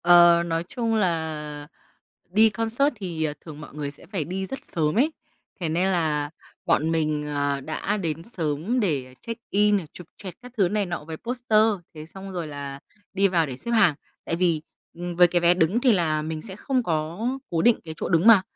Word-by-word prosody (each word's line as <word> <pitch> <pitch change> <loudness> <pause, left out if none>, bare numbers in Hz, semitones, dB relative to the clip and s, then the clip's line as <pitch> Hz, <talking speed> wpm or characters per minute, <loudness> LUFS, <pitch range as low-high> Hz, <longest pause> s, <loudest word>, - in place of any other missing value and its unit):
ờ, 175 0 +7
nói 165 0 -1
chung 230 -2 -1
là 155 -6 -1 0.6
đi 220 +3 +5
concert 230 +6 +1
thì, 170 -5 -3
à, 150 -1 -1
thường 155 -2 -10
mọi 150 - -10
người 145 -2 -3
sẽ 145 - -12
phải 175 -5 -2
đi 190 +3 -3
rất 270 - -7
sớm 155 -2 0
ấy. 300 +5 +4 0.5
Thế 165 - -1
nên 175 +4 +1
là 150 -4 0 0.4
bọn 160 +2 +2
mình, 155 -2 0
à, 145 -1 0
đã 160 +8 -2
đến 165 -4 -3
sớm 175 - -1
để 135 -10 -1
check 230 0 -6
in 210 +1 +4
này, 180 -6 -3
chụp 180 - -11
choẹt 185 -4 -8
các 250 -1 -11
thứ 190 -4 +3
này 205 -1 0
nọ 170 -4 -4
với 160 0 -6
poster, 235 -1 +1 0.3
thế 155 0 -8
xong 195 +3 -9
rồi 175 -3 -3
là 140 -1 -6 0.3
đi 195 0 +4
vào 170 -4 +2
để 130 -2 -6
xếp 235 - -5
hàng. 210 -9 +5 0.3
Tại 165 - -1
vì, 170 -3 +1 0.3
ừm, 175 0 -5
với 175 0 +7
cái 175 0 +1
vé 175 +1 +5
đứng 185 +7 +2
thì 250 -3 +5
là 155 -5 +1
mình 155 0 -4
sẽ 190 -3 -5
không 260 +2 0
có 170 +5 -1 0.2
cố 165 -1 +1
định 240 -1 +5
cái 160 - -6
chỗ - - -2
đứng 170 +2 +3
mà, 220 -5 +9
170 Hz, 215 wpm, -25 LUFS, 155-205 Hz, 0.6 s, mà